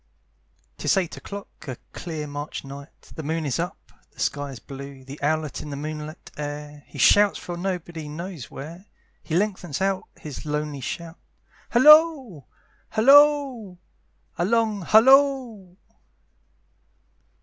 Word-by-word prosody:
Tis -, -, +2 dB
eight 180 Hz, -4 st, -1 dB
o'clock, 200 Hz, 0 st, -8 dB, 0.2 s
a 130 Hz, -3 st, -5 dB, 0.2 s
clear 160 Hz, -3 st, -5 dB
March 145 Hz, +1 st, -6 dB
night, 140 Hz, +1 st, -12 dB
The -, -, -6 dB
moon 160 Hz, +1 st, -2 dB
is 130 Hz, -6 st, -1 dB
up -, -, -5 dB, 0.2 s
the -, -, -23 dB
sky 145 Hz, 0 st, -1 dB
is 135 Hz, -, -8 dB
blue, 135 Hz, +2 st, -10 dB
The 140 Hz, +3 st, -9 dB
owlet 155 Hz, 0 st, -1 dB
in 150 Hz, -, -8 dB
the 140 Hz, -, -5 dB
moonlight 150 Hz, +1 st, -7 dB
air, 145 Hz, 0 st, -6 dB
He -, -, -12 dB
shouts 205 Hz, 0 st, +5 dB
from 175 Hz, -1 st, -6 dB
nobody 175 Hz, -4 st, -4 dB
knows 165 Hz, -5 st, -7 dB
where; 170 Hz, +8 st, -9 dB, 0.3 s
He 160 Hz, -, -4 dB
lengthens 185 Hz, -6 st, -1 dB
out 190 Hz, -1 st, 0 dB
his 150 Hz, -3 st, -8 dB
lonely 150 Hz, -2 st, -3 dB
shout, 165 Hz, +6 st, -6 dB, 0.5 s
Halloo! 285 Hz, -, +6 dB, 0.5 s
halloo! 270 Hz, -4 st, +4 dB, 0.6 s
a 175 Hz, -, +2 dB
long 220 Hz, -1 st, +1 dB
halloo! 235 Hz, -, +4 dB
170 Hz, 130 wpm, -24 LUFS, 145-210 Hz, 0.6 s, Halloo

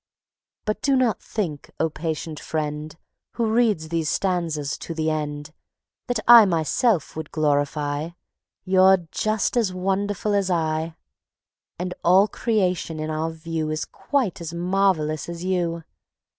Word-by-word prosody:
But 215 Hz, 0 st, -2 dB
do 275 Hz, -2 st, +3 dB
not 245 Hz, -6 st, +1 dB
think, 165 Hz, -10 st, -4 dB
O 160 Hz, -, +3 dB
patient 160 Hz, 0 st, -4 dB
friend, 155 Hz, 0 st, -4 dB, 0.4 s
Who 235 Hz, -, 0 dB
reads 215 Hz, -10 st, +2 dB
these 165 Hz, -2 st, -1 dB
stanzas 165 Hz, -6 st, -1 dB
to 165 Hz, -, -6 dB
the 155 Hz, 0 st, 0 dB
end, 150 Hz, 0 st, -4 dB, 0.5 s
That 245 Hz, -3 st, 0 dB
I 235 Hz, -1 st, +11 dB
myself 175 Hz, -, +1 dB
would 160 Hz, -1 st, -5 dB
glorify.... 145 Hz, 0 st, 0 dB, 0.6 s
You're 190 Hz, -1 st, +5 dB
just 215 Hz, +1 st, 0 dB
as 225 Hz, -6 st, +2 dB
wonderful 195 Hz, +2 st, -1 dB
as 200 Hz, -2 st, +1 dB
I, 160 Hz, -1 st, -1 dB, 0.8 s
And 180 Hz, +1 st, -3 dB
all 190 Hz, +4 st, +6 dB
Creation 185 Hz, -7 st, -1 dB
in 155 Hz, 0 st, -3 dB
our 155 Hz, +1 st, -1 dB
view 160 Hz, -1 st, -4 dB
Is 155 Hz, 0 st, -2 dB
quite 255 Hz, -, -2 dB
as 170 Hz, 0 st, -5 dB
marvelous 175 Hz, -4 st, +1 dB
as 170 Hz, +1 st, -6 dB
you. 170 Hz, -3 st, -1 dB
170 Hz, 135 wpm, -23 LUFS, 155-195 Hz, 0.8 s, I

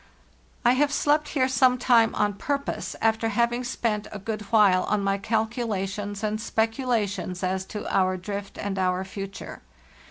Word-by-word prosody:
"T 240 Hz, -, +6 dB
have 285 Hz, +2 st, +2 dB
slept 295 Hz, +1 st, +2 dB
here 260 Hz, -4 st, +1 dB
some 255 Hz, 0 st, +4 dB
time 235 Hz, -3 st, +4 dB
on 210 Hz, -1 st, +1 dB
purpose, 280 Hz, +7 st, -3 dB
after 225 Hz, 0 st, +2 dB
hav 235 Hz, +2 st, +2 dB
ing 245 Hz, +1 st, -2 dB
spent 230 Hz, -4 st, -2 dB
a 210 Hz, -, -5 dB
good 215 Hz, +1 st, -4 dB
while 200 Hz, -5 st, +5 dB
on 210 Hz, -1 st, 0 dB
my 195 Hz, 0 st, +1 dB
calculations 210 Hz, -2 st, -2 dB
and 215 Hz, 0 st, -1 dB
specula 225 Hz, +1 st, 0 dB
tions 185 Hz, -2 st, -5 dB
as 190 Hz, +1 st, -1 dB
to 210 Hz, -, -6 dB
our 185 Hz, -1 st, +2 dB
drift 200 Hz, +2 st, -6 dB
and 200 Hz, -1 st, -3 dB
our 185 Hz, 0 st, +1 dB
future. 195 Hz, 0 st, -7 dB
215 Hz, 165 wpm, -26 LUFS, 195-240 Hz, -, T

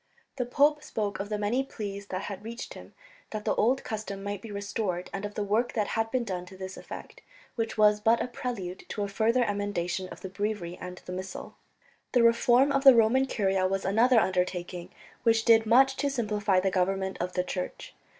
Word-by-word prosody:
The 250 Hz, -2 st, -1 dB
pope 295 Hz, +4 st, +3 dB
spoke 210 Hz, -9 st, -3 dB
of 200 Hz, +1 st, -4 dB
the 210 Hz, -, -1 dB
many 215 Hz, +6 st, 0 dB
pleas 200 Hz, -6 st, -6 dB
that 185 Hz, 0 st, -4 dB
had 200 Hz, 0 st, -6 dB
reached 235 Hz, +2 st, -7 dB
him -, -, -13 dB, 0.3 s
that 215 Hz, -1 st, -5 dB
the -, -, +2 dB
old 255 Hz, +5 st, +2 dB
custom 205 Hz, -3 st, -5 dB
might 205 Hz, -1 st, -4 dB
be 225 Hz, -, -9 dB
restored, 200 Hz, -3 st, -3 dB
and 195 Hz, +1 st, -3 dB
of 205 Hz, -, -7 dB
the 210 Hz, -, -1 dB
work 215 Hz, +4 st, 0 dB
that 210 Hz, -3 st, 0 dB
had 225 Hz, 0 st, 0 dB
been 255 Hz, 0 st, 0 dB
done 180 Hz, -4 st, -4 dB
to 190 Hz, 0 st, -12 dB
this 190 Hz, 0 st, -6 dB
effect, -, -, -10 dB, 0.3 s
which 225 Hz, -2 st, -3 dB
was 210 Hz, -1 st, +5 dB
but 225 Hz, +2 st, +3 dB
a -, -, -1 dB
prelude 225 Hz, -7 st, -5 dB
to 205 Hz, -, -2 dB
a -, -, -1 dB
further 225 Hz, +5 st, +2 dB
emendation 195 Hz, -4 st, -2 dB
of -, -, -11 dB
the 190 Hz, -, -6 dB
Breviary 200 Hz, -3 st, -3 dB
and 180 Hz, 0 st, -7 dB
the -, -, -7 dB
Missal. 185 Hz, 0 st, -6 dB, 0.6 s
The 245 Hz, -2 st, +5 dB
reform 240 Hz, +4 st, +5 dB
of 275 Hz, -1 st, +1 dB
the 270 Hz, -2 st, +9 dB
Roman 235 Hz, +4 st, +4 dB
Curia 190 Hz, -5 st, +1 dB
was 195 Hz, +1 st, -2 dB
another 230 Hz, +5 st, +4 dB
undertaking, 180 Hz, -2 st, -1 dB, 0.3 s
which 225 Hz, -2 st, +3 dB
did 225 Hz, -1 st, +5 dB
much 265 Hz, +4 st, +5 dB
to 285 Hz, +1 st, 0 dB
simplify 210 Hz, -6 st, +1 dB
the 190 Hz, +1 st, 0 dB
government 190 Hz, +1 st, 0 dB
of 180 Hz, +1 st, -3 dB
the 180 Hz, -, 0 dB
Church. 180 Hz, 0 st, -5 dB
210 Hz, 210 wpm, -28 LUFS, 190-230 Hz, 0.6 s, the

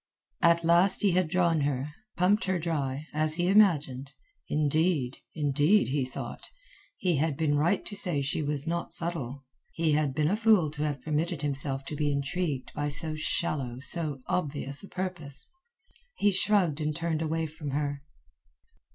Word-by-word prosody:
At 170 Hz, 0 st, +4 dB
last 175 Hz, +5 st, +7 dB
he 200 Hz, -, +4 dB
had 180 Hz, -1 st, +1 dB
drawn 170 Hz, -3 st, +1 dB
her, 140 Hz, +1 st, -2 dB, 0.2 s
pumped 195 Hz, +5 st, +2 dB
her 190 Hz, -1 st, 0 dB
dry, 150 Hz, -4 st, -3 dB
as 155 Hz, 0 st, +4 dB
he 175 Hz, +1 st, 0 dB
imagined. 150 Hz, -10 st, +2 dB, 0.4 s
Indeed, 150 Hz, -3 st, 0 dB, 0.2 s
indeed, 150 Hz, +6 st, +2 dB
he 135 Hz, -1 st, 0 dB
thought, 130 Hz, -, -8 dB, 0.5 s
he 180 Hz, -5 st, 0 dB
had 150 Hz, -1 st, -1 dB
been 155 Hz, -2 st, +1 dB
right 165 Hz, +7 st, +1 dB
to 205 Hz, -, -5 dB
say 170 Hz, -8 st, +1 dB
she 140 Hz, +3 st, -2 dB
was 145 Hz, -1 st, -3 dB
not 170 Hz, +1 st, -3 dB
subtle. 140 Hz, -6 st, -3 dB, 0.3 s
He 165 Hz, -1 st, 0 dB
had 145 Hz, -3 st, 0 dB
been 155 Hz, +2 st, +1 dB
a -, -, +2 dB
fool 215 Hz, -8 st, +3 dB
to 150 Hz, -1 st, -7 dB
have 145 Hz, -4 st, -3 dB
permitted 155 Hz, 0 st, -2 dB
himself 135 Hz, -1 st, -2 dB
to 150 Hz, -, -6 dB
be 145 Hz, 0 st, 0 dB
intrigued 140 Hz, 0 st, -3 dB
by 145 Hz, 0 st, -2 dB
so 155 Hz, +2 st, 0 dB
shallow, 155 Hz, -5 st, -2 dB
so 145 Hz, -1 st, +2 dB
obvious 140 Hz, -4 st, -2 dB
a -, -, -9 dB
purpose. 175 Hz, -7 st, -5 dB, 0.7 s
He 205 Hz, -, +2 dB
shrugged 185 Hz, -6 st, +2 dB
and 150 Hz, 0 st, -2 dB
turned 165 Hz, -1 st, -2 dB
away 160 Hz, 0 st, -1 dB
from 155 Hz, -1 st, -7 dB
her. 145 Hz, 0 st, -3 dB
155 Hz, 165 wpm, -28 LUFS, 140-170 Hz, 0.7 s, last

